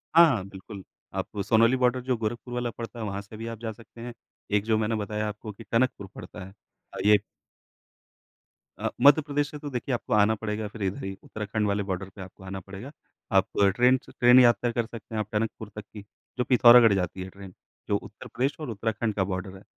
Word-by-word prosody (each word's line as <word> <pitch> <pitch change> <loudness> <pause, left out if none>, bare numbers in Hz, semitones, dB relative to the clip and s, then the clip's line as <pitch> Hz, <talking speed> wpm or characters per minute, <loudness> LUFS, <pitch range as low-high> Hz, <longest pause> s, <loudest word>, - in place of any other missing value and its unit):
हाँ, 170 0 +10
हाँ 95 -2 -5
बिल्कुल। 95 0 -10 0.3
आप 105 - -5
सोनौली 115 +2 +4
बॉर्डर 125 0 +2
जो 125 0 0
गोरखपुर 120 +2 -4
वाला 120 -1 -1
पड़ता 115 +1 -8
है, 110 - -3
वहाँ 100 0 -4
से 105 +2 -12
भी 115 +1 -6
आप 115 -1 -6
जा 115 -1 -4
सकते 115 +1 -14
हैं। 120 0 -6 0.4
एक 105 0 +3
जो 110 -1 +2
मैंने 110 +1 0
बताया 105 0 -2
आपको 105 +1 -6
कि 110 +3 -12
टनकपुर 115 -4 +1
पड़ता 100 - -9
है। 95 - -13 0.4
अ, - - -7
ये 105 0 +7 1.6
अ, - - -1
मध्य 145 +3 +7
प्रदेश 145 0 -1
से 150 - -7
तो 145 - -6
देखिए 125 0 -3
आपको - - -4
आना 105 +1 +4
पड़ेगा 105 0 -3
फिर 105 -1 -7
इधर 95 0 -2
ही 95 0 -4
उत्तराखंड 105 0 -3
वाले 100 0 0
बॉर्डर 95 0 -4
पे 95 - -9
आपको 95 +1 -12
आना 95 0 -6
पड़ेगा। 100 +9 -9 0.5
आप - - +4 0.3
ट्रेन 125 +1 +5
से - - -14
ट्रेन 125 +1 +6
यात्रा 120 0 +4
कर 115 0 -1
सकते 110 -1 -9
हैं, - - 0
आप 105 - -2
टनकपुर 110 0 -2
तक 105 - -6
की, 105 - -8 0.4
जो 125 - +1
पिथौरागढ़ 120 -3 +8
जाती 95 0 -2
है 95 - -8
ट्रेन, 95 -1 -12 0.4
जो - - +3
उत्तर - - -11
प्रदेश 135 +4 -1
और 150 -5 -5
उत्तराखंड 110 0 -2
का 95 - +1
बॉर्डर 95 0 -4
है। 95 - -16
110 Hz, 220 wpm, -27 LUFS, 100-120 Hz, 1.6 s, हाँ